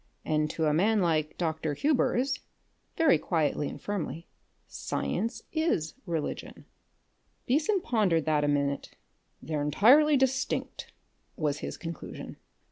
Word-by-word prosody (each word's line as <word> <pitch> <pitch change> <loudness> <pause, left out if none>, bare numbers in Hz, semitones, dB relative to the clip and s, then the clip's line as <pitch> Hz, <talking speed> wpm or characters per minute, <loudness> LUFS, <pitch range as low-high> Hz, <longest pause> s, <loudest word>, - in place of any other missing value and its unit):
"And 155 0 +1
to 160 - -1
a 150 - +3
man 210 +7 +3
like 155 -4 0
Dr. 160 -3 -1
Hubers" 275 - +1 0.6
very 320 - +5
quietly 150 -4 0
and - - -8
firmly 175 -4 -4 0.4
"science 225 0 -3
is 315 - 0
religion." 165 -3 -4 0.8
Beason 315 - +2
pondered 195 - +1
that 155 -2 +2
a - - +2
minute. 140 -1 -1 0.5
"They're 155 -2 -2
entirely 255 - +5
distinct," 265 0 -1 0.4
was 150 -2 -1
his - - -5
conclusion. 165 -2 -7
170 Hz, 120 wpm, -29 LUFS, 155-250 Hz, 0.8 s, very